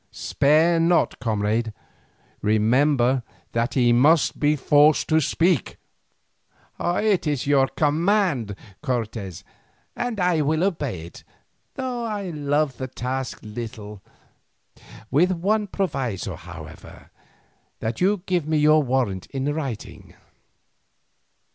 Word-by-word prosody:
Spare 160 +4 +2
not, 170 +1 +2
comrade; 110 -1 -1 0.7
remember 125 +4 +2 0.3
that 115 +2 -1
he 120 -3 +4
must 150 +6 +3
be 150 0 +3
forced 145 +2 +4
to 160 0 +4
speak." 165 - +1 1.0
"It 185 0 +1
is 145 -4 -1
your 140 -2 +3
command, 155 - +1 0.3
Cortes, 115 - -4 0.5
and 240 -3 -3
I 180 -3 +2
will 155 +3 +1
obey 145 - -2
it, 85 - -13 0.5
though 255 -2 -3
I 205 -5 -3
love 145 -3 0
the 130 - -4
task 130 +1 -4
little; 105 -2 -8 1.1
with 175 +7 +3
one 205 +5 0
proviso, 130 - -3
however, 80 -1 -12 0.7
that 110 +6 -4
you 195 0 +2
give 175 -5 0
me 155 0 +1
your 155 +1 +5
warrant 125 -8 -1
in 140 +1 -2
writing." 135 -8 -6
145 Hz, 110 wpm, -23 LUFS, 115-170 Hz, 1.1 s, your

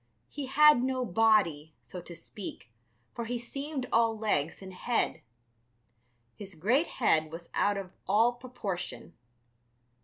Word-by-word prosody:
He 280 -2 -5
had 300 -1 +6
no 255 0 0
body, 180 -8 +2
so 180 - -8
to 170 0 -10
speak, 170 - -7 0.4
for 235 - -4
he 240 +2 -2
seemed 275 +3 -4
all 230 -1 +3
legs 165 -8 -1
and 190 -1 -10
head. 235 +6 -1 1.1
His 195 -3 -8
great 235 - +2
head 160 -10 +1
was 170 +1 -8
out 205 0 +2
of 190 -2 -6 0.2
all 225 +5 +4
proportion. 240 -7 -6
220 Hz, 130 wpm, -30 LUFS, 180-245 Hz, 1.1 s, had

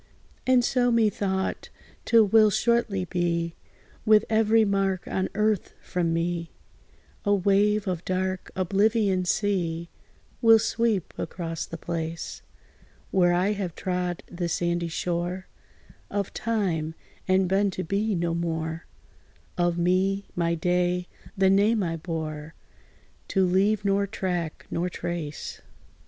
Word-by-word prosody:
And 255 -2 +5
so, 245 -1 +2
methought, 205 -4 0 0.4
't 230 -1 +6
will 215 +1 +5
shortly 215 -3 +1
be 170 -2 -1 0.5
With 215 0 +5
every 220 0 +4
mark 195 -2 0
on 190 0 -1
earth 210 -2 0
from 175 -2 -1
me; 170 0 -1 0.7
A 205 -1 +3
wave 205 +2 +2
of 180 -2 -2
dark 185 0 -2
oblivion's 195 0 +2
sea 170 -5 -1 0.5
Will 225 -2 +8
sweep 220 -4 0
across 165 -3 -4
the 165 - -7
place, 165 -1 -4 0.7
Where 180 -2 +4
I 180 +3 +2
have 195 -5 -3
trod 180 -1 -2
the 175 -1 -4
sandy 170 0 0
shore 175 +2 -2 0.6
Of 200 -1 -2
time, 180 -9 -1 0.3
and 185 0 +3
been 195 +2 +2
to 185 0 -4
be 200 +4 0
no 170 -1 0
more, 165 -1 -3 0.7
Of 175 -1 +1
me 185 +3 +1
my 170 -1 +1
day 180 +1 0 0.3
the 190 0 +4
name 205 +2 +3
I 165 -2 -1
bore, 155 -2 -5 0.7
To 190 -2 +2
leave 195 +3 +2
nor 200 0 +2
track, 175 -5 -3
nor 175 +2 -1
trace. 170 -4 -5
185 Hz, 125 wpm, -26 LUFS, 170-205 Hz, 0.7 s, Will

